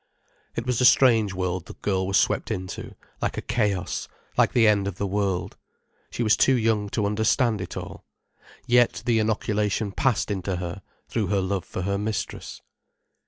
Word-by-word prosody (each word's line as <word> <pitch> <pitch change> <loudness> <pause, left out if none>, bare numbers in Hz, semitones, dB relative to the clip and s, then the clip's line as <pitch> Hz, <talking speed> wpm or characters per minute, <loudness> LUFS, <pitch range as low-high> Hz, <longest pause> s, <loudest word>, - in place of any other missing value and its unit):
It 115 - -3
was 125 -1 0
a - - +5
strange 115 -6 +5
world 90 -1 -2
the - - -8
girl 95 -2 -1
was 100 0 +2
swept - - +1
into, 95 0 -5 0.3
like - - -1
a - - -1
chaos, 105 -6 -1 0.3
like - - +3
the 115 -3 +5
end 100 -2 +3
of 100 - -4
the 100 - -1
world. 100 -2 -1 0.5
She 120 - -2
was 110 -1 +4
too 135 - +4
young 110 -3 +1
to 105 0 -1
understand 110 +1 +1
it - - -6
all. - - -7 0.6
Yet 120 0 +3
the 115 -2 +3
inoculation 105 -1 0
passed 120 0 0
into 95 -1 -2
her, 90 +2 -5 0.3
through 110 -4 -1
her 100 +1 +1
love 95 -1 -2
for 95 - -5
her 100 +1 -1
mistress. 105 +1 -4
105 Hz, 175 wpm, -25 LUFS, 95-115 Hz, 0.6 s, a